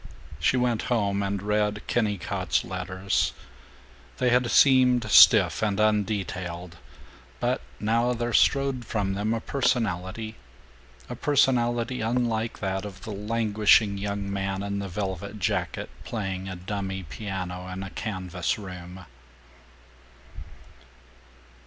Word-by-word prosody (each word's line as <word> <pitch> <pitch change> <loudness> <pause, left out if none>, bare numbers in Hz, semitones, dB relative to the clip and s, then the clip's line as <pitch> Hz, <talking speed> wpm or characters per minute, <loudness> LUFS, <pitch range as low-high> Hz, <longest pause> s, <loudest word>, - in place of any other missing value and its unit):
She 80 +11 +2
went 120 -3 +1
home 100 -4 +1
and 100 0 -2
read 105 0 0
Kennicott's 105 -6 0
letters. 95 +1 -1 0.8
They 125 -1 +2
had 125 0 +3
seemed 130 -2 +5
stiff 95 -6 +7
and 105 -3 0
undetailed, 95 -5 -1 0.6
but - - 0 0.2
now 115 +3 +1
there 120 0 -2
strode 135 -2 +3
from 100 -4 -1
them 105 +3 -1
a 115 - 0
personality, 110 -5 -1 0.7
a - - -5
personality 125 -3 +1
unlike 115 -1 -1
that 95 -1 -2
of 95 -2 -9
the 110 - -6
languishing 105 -1 +2
young 100 0 -3
man 95 0 -2
in 100 0 -3
the 100 -1 -4
velvet 100 +1 -4
jacket 95 - -2
playing 95 -4 -4
a 95 - -5
dummy 95 +1 -4
piano 90 - -5
in 95 +1 -5
a 95 - -7
canvas 90 -5 -3
room. 90 -2 -9
105 Hz, 115 wpm, -26 LUFS, 95-115 Hz, 0.8 s, stiff